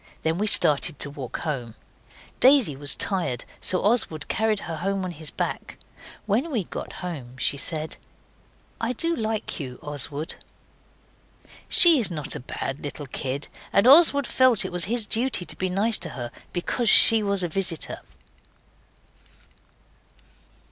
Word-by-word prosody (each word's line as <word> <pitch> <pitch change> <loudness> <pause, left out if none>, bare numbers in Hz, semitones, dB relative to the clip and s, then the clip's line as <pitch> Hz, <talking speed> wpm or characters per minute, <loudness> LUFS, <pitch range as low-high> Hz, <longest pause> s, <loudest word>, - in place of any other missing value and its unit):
Then 160 +2 -1
we 210 - 0
started 150 -4 +4
to 145 - -1
walk 135 -4 -7
home. 125 -8 -5 0.6
Daisy 260 - +4
was 145 +1 +2
tired 175 - -1
so 185 - 0
Oswald 205 -9 +2
carried 220 -2 0
her 165 -2 -6
home 195 +3 -2
on 180 - -5
his 155 -2 -7
back. - - -5 0.5
When 225 +10 0
we 235 -10 -1
got - - -8
home 130 -8 -7
she 135 - +1
said 155 +1 -3 0.8
'I 230 +2 -1
do 335 +7 +1
like 220 - -4
you, 125 -4 -7
Oswald.' 145 +1 -5 1.3
She 335 -5 +7
is 225 - +1
not 155 -5 -3
a - - -5
bad 135 +2 -6
little 145 0 -6
kid; 135 +1 -5 0.2
and 200 - +3
Oswald 285 0 +6
felt 255 -7 +3
it - - -5
was 175 -2 0
his 230 +2 0
duty 230 -3 +1
to - - -5
be 185 - -3
nice 205 +4 +1
to 165 - -4
her 120 -5 -7 0.2
because 215 +6 -1
she 225 +2 +7
was 200 -2 -1
a - - 0
visitor. 170 -1 -3
180 Hz, 150 wpm, -24 LUFS, 145-220 Hz, 1.3 s, She